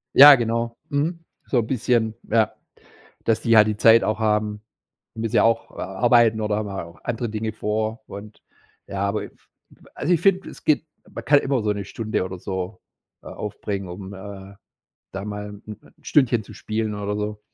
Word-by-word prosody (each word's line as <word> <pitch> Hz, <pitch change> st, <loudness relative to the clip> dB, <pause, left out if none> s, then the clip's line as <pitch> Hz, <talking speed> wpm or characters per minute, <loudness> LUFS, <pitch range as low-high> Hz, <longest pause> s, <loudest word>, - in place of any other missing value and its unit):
Ja, 145 Hz, +1 st, +11 dB
genau. 115 Hz, -1 st, -2 dB
Mhm. 165 Hz, +4 st, -1 dB, 0.2 s
So 130 Hz, -, +1 dB
‘n 110 Hz, -, -2 dB
bisschen, 120 Hz, -3 st, +1 dB, 0.2 s
ja, 110 Hz, 0 st, +2 dB, 0.7 s
dass 115 Hz, -1 st, +2 dB
die 115 Hz, -1 st, +3 dB
halt 110 Hz, 0 st, +7 dB
die 105 Hz, -, -1 dB
Zeit 115 Hz, +2 st, +6 dB
auch 110 Hz, +1 st, 0 dB
haben. 105 Hz, -1 st, 0 dB, 0.5 s
Müssen 110 Hz, -1 st, -2 dB
ja -, -, +6 dB
auch, 115 Hz, 0 st, +1 dB
äh, -, -, -9 dB
arbeiten 110 Hz, +3 st, +3 dB
oder 105 Hz, -1 st, 0 dB
haben 105 Hz, -1 st, -3 dB
auch 85 Hz, -4 st, -7 dB
andere 120 Hz, -1 st, -2 dB
Dinge 110 Hz, 0 st, -3 dB
vor 110 Hz, +3 st, -2 dB
und 105 Hz, +2 st, -11 dB, 0.4 s
ja, 95 Hz, -, -5 dB
aber 105 Hz, +1 st, -2 dB
i -, -, -7 dB
f -, -, -28 dB, 0.5 s
also 175 Hz, -, 0 dB
ich 170 Hz, -, +3 dB
finde, 195 Hz, -1 st, +2 dB
es -, -, -13 dB
gibt 155 Hz, +1 st, +2 dB, 0.2 s
man -, -, -8 dB
kann 145 Hz, 0 st, +6 dB
immer 135 Hz, -4 st, 0 dB
so 105 Hz, -, +1 dB
‘ne 100 Hz, -1 st, -5 dB
Stunde 110 Hz, -4 st, -2 dB
oder 95 Hz, 0 st, -6 dB
so, 95 Hz, +1 st, -5 dB, 0.4 s
äh, -, -, -19 dB
aufbringen, 100 Hz, -2 st, -5 dB
um, 95 Hz, +2 st, -8 dB
äh, 95 Hz, 0 st, -10 dB, 0.6 s
da 95 Hz, +1 st, -5 dB
mal 105 Hz, 0 st, -5 dB
‘n 105 Hz, 0 st, -12 dB
‘n 105 Hz, -, -11 dB
Stündchen 120 Hz, -6 st, +2 dB
zu -, -, -13 dB
spielen 110 Hz, -1 st, -3 dB
oder 105 Hz, 0 st, -3 dB
so. 105 Hz, 0 st, -3 dB
110 Hz, 190 wpm, -23 LUFS, 105-115 Hz, 0.7 s, Ja